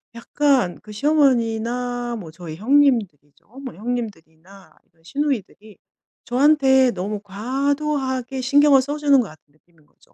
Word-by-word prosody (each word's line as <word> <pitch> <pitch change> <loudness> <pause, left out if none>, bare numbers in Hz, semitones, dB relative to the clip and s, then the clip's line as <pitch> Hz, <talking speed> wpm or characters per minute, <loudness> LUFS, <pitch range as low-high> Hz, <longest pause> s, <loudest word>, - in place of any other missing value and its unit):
약간 255 -6 0
그 215 - -13
시어머니나 245 -2 0
뭐 175 -6 -9
저희 165 -2 -9
형님들이죠. 215 - 0 0.2
뭐 255 - -7
형님들이나 195 -5 -7
이런 165 0 -33
시누이들이 220 - -4 0.5
저한테 265 0 +3
너무 205 +1 -4
과도하게 265 +4 -2
신경을 280 +1 +4
써 285 +3 -4
주는 285 -2 +4
것 225 - -5
같은 155 - -17
느낌인 155 0 -30
거죠. - - -30
245 Hz, 310 characters per minute, -21 LUFS, 195-275 Hz, 0.5 s, 신경을